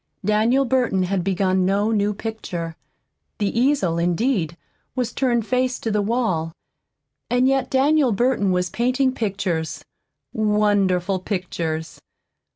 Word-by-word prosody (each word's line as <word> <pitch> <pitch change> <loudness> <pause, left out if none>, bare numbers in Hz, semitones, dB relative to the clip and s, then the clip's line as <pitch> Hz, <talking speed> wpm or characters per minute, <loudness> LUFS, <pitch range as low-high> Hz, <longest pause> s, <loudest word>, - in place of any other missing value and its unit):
Daniel 225 +6 +3
Burton 245 -7 +1
had 185 0 -1
begun 185 0 +1
no 200 +4 +1
new 205 -1 +1
picture. 190 -6 -5 0.6
The 205 0 -1
easel, 240 - +2
indeed, 175 - 0 0.4
was 250 -2 -2
turned 240 -4 +1
face 255 +1 0
to 225 - -3
the 210 0 +1
wall. 200 -8 -1 0.8
And 250 +2 +3
yet 270 -1 +1
Daniel 275 0 +3
Burton 215 -2 +1
was 180 -1 0
painting 255 +2 +1
pictures, 170 - -2 0.5
wonderful 205 -3 +1
pictures. 170 -4 -4
210 Hz, 120 wpm, -22 LUFS, 180-245 Hz, 0.8 s, Daniel